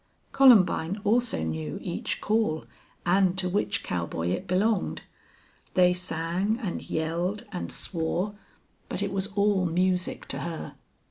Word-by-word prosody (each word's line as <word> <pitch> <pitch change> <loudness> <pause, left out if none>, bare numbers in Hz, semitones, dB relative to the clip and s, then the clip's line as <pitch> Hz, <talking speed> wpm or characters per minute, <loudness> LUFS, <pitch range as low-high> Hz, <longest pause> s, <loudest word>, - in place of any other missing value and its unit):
Columbine 200 -7 +5
also 230 - +2
knew 80 -1 -3
each - - -3
call 215 -8 +1 0.4
and 185 +1 +3
to 185 -1 0
which 195 +3 0
cowboy 85 -1 -2
it 90 - -2
belonged. 200 +3 +1 0.7
They 180 -1 +5
sang 180 +4 -1
and 205 -8 -3
yelled 170 +6 -1
and 180 - -4
swore, 175 +3 -2 0.6
but - - -2
it - - -2
was 195 0 -1
all 200 -3 +3
music 180 +2 0
to - - 0
her. 170 -2 -5
180 Hz, 130 wpm, -27 LUFS, 165-205 Hz, 0.7 s, Columbine